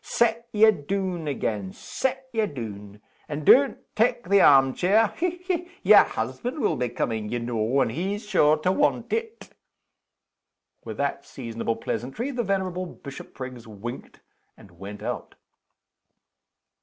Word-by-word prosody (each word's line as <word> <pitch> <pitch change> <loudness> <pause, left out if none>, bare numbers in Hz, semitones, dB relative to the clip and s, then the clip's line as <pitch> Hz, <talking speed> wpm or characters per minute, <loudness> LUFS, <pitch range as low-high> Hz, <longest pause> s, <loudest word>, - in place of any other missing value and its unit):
Set 235 0 +1
ye 220 0 +6
doon 185 -1 -3
again 105 -8 -2
set 265 - -3
ye 220 -2 +1
doon. 105 - -8 0.3
And 150 0 -4
don't 275 - +6 0.2
tak' 225 -3 +1
the 200 0 +6
arm 135 -2 +6
chair. 205 +4 +3
Hech! 355 +1 -2
hech! 355 -2 -1 0.2
yer - - +9
husband 245 +4 -4
will 215 - +1
be 125 -2 -1
coming, 110 -2 -2
ye 120 - -1
know, 120 +2 0
and - - +1
he's 195 - -3
sure 155 -6 +4
to 165 +4 +1
want 290 +9 +1
it!" 455 0 -4 1.3
With - - -7
that - - -1
seasonable 115 -2 -4
pleasantry 130 - -4
the 250 -2 -1
venerable 185 -3 -1
Bishopriggs 130 -5 -9
winked, 110 +3 -8 0.4
and 95 - -16
went 100 +2 -8
out. - - -5
160 Hz, 140 wpm, -25 LUFS, -, 1.3 s, yer